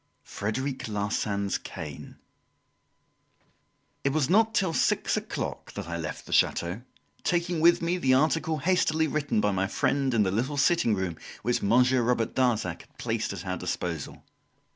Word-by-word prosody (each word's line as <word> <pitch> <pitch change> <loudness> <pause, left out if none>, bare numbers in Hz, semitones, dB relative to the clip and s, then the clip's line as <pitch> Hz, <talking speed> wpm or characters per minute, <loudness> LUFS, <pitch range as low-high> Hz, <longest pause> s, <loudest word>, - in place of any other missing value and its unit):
Frederic 130 +6 -3
Larsan's 100 -1 -1
Cane - - -8 1.9
It 140 - +2
was 155 +1 +1
not 225 +3 +4
till 185 -4 +2
six - - +1
o'clock - - -4
that - - -6
I 85 - -4
left 80 -2 -5
the - - -6
chateau, 90 +6 +2 0.4
taking 175 -1 0
with 170 +1 +5
me 175 +2 0
the 130 -5 +4
article 160 +3 +2
hastily 160 0 +2
written 145 -5 0
by 105 0 +2
my 95 0 0
friend 135 +4 0
in 110 - +4
the 95 - 0
little 125 +8 -1
sitting 140 -6 +3
room 95 -4 -3 0.3
which 120 0 +1
Monsieur 125 +4 +4
Robert 120 -1 0
Darzac 110 -9 0
had - - -23
placed 115 -1 -2
at 100 -2 -7
our 95 0 -2
disposal. 85 -4 -4
125 Hz, 155 wpm, -27 LUFS, 100-155 Hz, 1.9 s, with